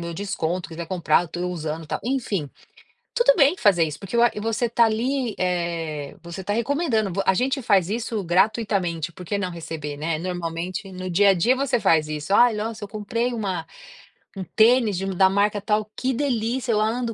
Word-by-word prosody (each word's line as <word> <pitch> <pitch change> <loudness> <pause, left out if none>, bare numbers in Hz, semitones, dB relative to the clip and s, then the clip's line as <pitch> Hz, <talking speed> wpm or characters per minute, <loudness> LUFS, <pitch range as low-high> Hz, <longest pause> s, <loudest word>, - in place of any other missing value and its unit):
meu 170 0 -5
desconto, 180 -3 -3
quiser 165 +1 -6
comprar, 175 -1 +2
estou 175 +2 -4
usando, 160 -2 -4
tal", - - -3
enfim. 225 - -2 0.6
Tudo - - +5
bem 295 +2 +4
fazer 195 - +3
isso, 150 -2 -5
porque 195 +3 -9
eu 235 - +4
a 240 - +5
você 225 +2 0
está 235 0 +3
ali, 240 +1 -1
eh, 170 -5 -2
você 170 +2 -7
está 200 +2 -3
recomendando 235 - 0
vo 195 +3 -1
a 190 - +3
gente 270 +5 0
faz 195 -6 +3
isso 225 -1 -2
gratuitamente, 180 -3 0
por 180 - -10
que 205 - -2
não 185 -2 -2
receber, 160 -3 -6
né? 155 +2 -2
Normalmente, 180 +2 -4
no 185 0 -6
dia 200 +4 +4
a 195 - +4
dia, 230 +9 +3
você 270 -2 +1
faz 155 -5 +3
isso, 150 +4 -4
“Ai, 240 0 +6
nossa, 220 +1 -4
eu - - -8
comprei 230 +4 -2
uma 195 -8 -3 0.7
um 190 - -3
tênis 225 -3 +4
de 190 - -3
da 190 +1 +5
marca 205 +1 +1
tal. 210 +1 -1
Que 260 0 0
delícia. 245 -1 -1
Eu 215 -1 +2
ando 230 +1 -1
200 Hz, 195 wpm, -23 LUFS, 170-230 Hz, 0.7 s, Ai